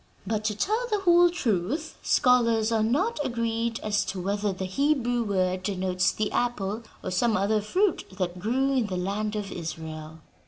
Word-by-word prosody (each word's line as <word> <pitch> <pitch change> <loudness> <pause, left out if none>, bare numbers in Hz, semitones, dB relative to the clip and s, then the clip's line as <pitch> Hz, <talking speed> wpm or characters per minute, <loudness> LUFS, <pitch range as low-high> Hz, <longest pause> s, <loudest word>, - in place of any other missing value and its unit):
But, 215 +1 -1
to 210 -1 0
tell 440 - 0
the 420 -2 0
whole 350 -1 +6
truth, 265 - -1
scholars 230 -4 +3
are 225 -1 +2
not 300 - +1
agreed 230 -2 -1
as 210 -1 +1
to 185 0 -4
whether 200 +2 -1
the 190 0 -4
Hebrew 245 +2 +1
word 185 -3 0
denotes 185 -1 0
the 215 -1 -2
apple 220 -3 -1 0.2
or - - -3
some 220 +4 +2
other 210 +3 +1
fruit 365 - +1
that 180 -2 -2
grew 255 +8 +1
in 245 -5 +1
the 185 -2 -3
land 205 +4 -2
of 205 -2 -4
Israel." 160 -2 -6
215 Hz, 170 wpm, -26 LUFS, 190-245 Hz, 0.2 s, whole